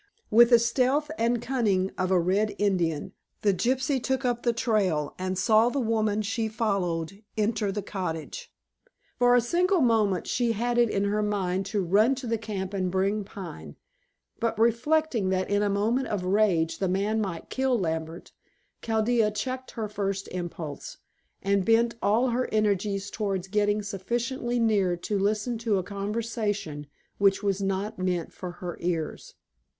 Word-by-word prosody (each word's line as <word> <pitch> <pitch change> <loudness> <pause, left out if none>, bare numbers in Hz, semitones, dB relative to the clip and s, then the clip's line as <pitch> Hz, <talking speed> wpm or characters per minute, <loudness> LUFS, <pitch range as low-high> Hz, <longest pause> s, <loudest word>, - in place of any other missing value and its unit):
With 235 +2 +7
the 240 - +8
stealth 255 +6 +1
and 235 -1 +1
cunning 220 -7 0
of 185 -1 -1
a 185 -1 +4
Red 195 +5 +1
Indian, 185 -3 0 0.3
the 205 -2 +4
gypsy 255 +6 0
took 265 +1 -1
up 240 -1 0
the 240 - +2
trail, 205 - 0
and 185 0 -2
saw 220 +4 +4
the 280 - -2
woman 215 -3 +1
she 225 +2 -1
followed 195 -5 -2 0.2
enter 210 -1 0
the 205 0 -4
cottage. 190 - -5 0.7
For 245 0 +5
a 245 - +5
single 355 - +2
moment 220 - +2
she 235 -1 0
had 240 +2 0
it 235 -1 +4
in 195 - 0
her 205 +1 +1
mind 195 -2 -1
to 200 -1 -1
run 215 +9 +4
to 260 0 -7
the 230 -1 -1
camp 200 -3 -4
and 185 -2 -1
bring 195 +3 0
Pine, 80 - -9 0.6
but 230 0 -1
reflecting 235 0 +2
that 185 +1 -1
in 205 0 +2
a 205 - +1
moment 220 +6 +1
of 195 -4 -2
rage 185 -4 +2
the 190 - 0
man 205 +4 0
might 185 -5 -5
kill 265 -2 +1
Lambert, 160 -3 -3 0.5
Chaldea 225 0 +2
checked 255 +4 -4
her 220 -2 -2
first 195 -2 -3
impulse, 170 -5 -6 0.5
and 200 0 +2
bent 230 +3 +3
all 230 +5 +3
her 250 +2 -1
energies 200 -2 0
towards 195 -4 -2
getting 205 +1 +1
sufficiently 240 +5 -2
near 200 -6 +2
to 200 +4 -2
listen 215 +4 0
to 225 -3 +1
a 185 - -1
conversation 205 - -3 0.3
which 195 0 +3
was 200 -1 0
not 195 +1 -2
meant 180 -3 -1
for 180 -2 -7
her 175 -1 -6
ears. 165 -3 -3
210 Hz, 165 wpm, -27 LUFS, 190-235 Hz, 0.7 s, the